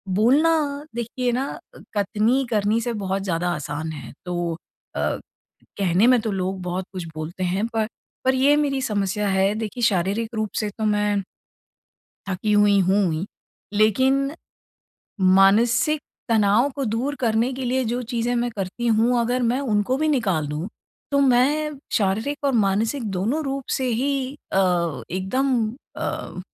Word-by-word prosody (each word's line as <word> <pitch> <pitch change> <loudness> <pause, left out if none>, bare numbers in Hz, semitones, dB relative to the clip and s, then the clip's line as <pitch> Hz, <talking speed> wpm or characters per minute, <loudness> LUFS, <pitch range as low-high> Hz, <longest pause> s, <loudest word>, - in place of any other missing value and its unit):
बोलना 290 +5 +3
देखिए 240 +1 -2
ना 260 +3 -1 0.3
अ, - - -12 0.2
कथनी 220 +6 +2
करनी 215 0 +1
से 240 0 -2
बहुत 195 +1 -1
ज़्यादा 175 -2 -1
आसान 150 +2 -4
है। 155 - -9
तो 175 -1 -2 0.4
अ, - - -2 0.8
कहने 190 +3 +3
में 250 -1 +6
तो 220 -2 -2
लोग 190 0 -2
बहुत 180 +1 -3
कुछ 180 -2 -5
बोलते 165 +4 -5
हैं 190 +5 0
पर, 225 -2 -1 0.4
पर 260 - +4
ये 275 +3 +4
मेरी 275 -3 0
समस्या 205 -2 -1
है। 195 +1 +2
देखिए 220 +2 -4
शारीरिक 210 +3 +1
रूप 215 -1 -1
से 215 - -1
तो 220 +2 -4
मैं 210 -1 +1 1.1
थकी 195 +3 -1
हुई 205 -1 +5
हूँ 190 -1 +2
ही। 160 +5 -3 0.5
लेकिन, 260 +7 +3 1.1
मानसिक 235 +9 +4 0.3
तनाव 220 +3 +4
को 275 - -1
दूर 240 +6 -1
करने 230 +1 +1
के 260 0 -4
लिए 255 +1 +1
जो 240 +2 -1
चीज़ें 240 +1 0
मैं 240 0 0
करती 195 +5 -3
हूँ, 235 +2 +3
अगर 245 +2 0
मैं 245 +3 +1
उनको 230 -1 +1
भी 310 +2 0
निकाल 195 - +1
दूँ 155 +7 -4 0.4
तो 280 - +3
मैं 280 +3 +2
शारीरिक 220 +9 0
और 280 - +2
मानसिक 220 +5 +1
दोनों 210 +12 -1
रूप 275 -1 -3
से 260 - -2 0.2
ही 280 +2 +1 0.4
अ, 175 -5 +1
एकदम 225 +10 0 0.4
अ, - - -4
220 Hz, 155 wpm, -23 LUFS, 195-255 Hz, 1.1 s, में